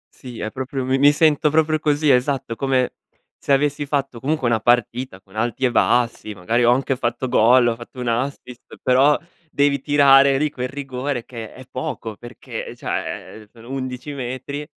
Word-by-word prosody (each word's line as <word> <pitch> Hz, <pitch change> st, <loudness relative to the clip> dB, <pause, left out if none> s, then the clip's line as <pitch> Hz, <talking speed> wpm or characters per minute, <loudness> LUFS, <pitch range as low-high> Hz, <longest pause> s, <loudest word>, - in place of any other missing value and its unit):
Sì 125 Hz, -3 st, -10 dB
è 110 Hz, -, -4 dB
proprio 130 Hz, 0 st, -4 dB
mi 135 Hz, +1 st, +1 dB
mi 145 Hz, +1 st, +7 dB
sento 150 Hz, 0 st, +3 dB
proprio 155 Hz, 0 st, +2 dB
così 150 Hz, -1 st, +2 dB
esatto, 125 Hz, -2 st, 0 dB
come 130 Hz, 0 st, 0 dB, 0.4 s
se -, -, -4 dB
avessi 145 Hz, +1 st, +1 dB
fatto 140 Hz, -4 st, -2 dB
comunque 140 Hz, 0 st, -1 dB
una 115 Hz, -1 st, +2 dB
partita, 120 Hz, -2 st, 0 dB
con 100 Hz, -, -22 dB
alti 120 Hz, +3 st, -1 dB
e 125 Hz, -, +2 dB
bassi, 120 Hz, -3 st, +1 dB
magari 115 Hz, +7 st, 0 dB
ho 120 Hz, -, +5 dB
anche 135 Hz, +2 st, +1 dB
fatto 120 Hz, 0 st, -2 dB
gol, 120 Hz, +1 st, +5 dB
ho 115 Hz, -, -1 dB
fatto 120 Hz, +2 st, -12 dB
un 125 Hz, -, -4 dB
assist, 125 Hz, 0 st, -4 dB
però 135 Hz, +4 st, +4 dB, 0.3 s
devi 140 Hz, -2 st, +1 dB
tirare 140 Hz, -1 st, +5 dB
lì 150 Hz, +1 st, 0 dB
quel 125 Hz, -2 st, -4 dB
rigore 135 Hz, -2 st, -4 dB
che 115 Hz, -3 st, -8 dB
è 130 Hz, -, -13 dB
poco 130 Hz, -7 st, -5 dB
perché, 120 Hz, +3 st, -8 dB
ehm, -, -, -9 dB
cioè, 110 Hz, -1 st, -5 dB
sono 115 Hz, +1 st, -13 dB
11 130 Hz, +1 st, -5 dB
metri, 130 Hz, +2 st, -5 dB
130 Hz, 180 wpm, -21 LUFS, 120-140 Hz, 0.4 s, mi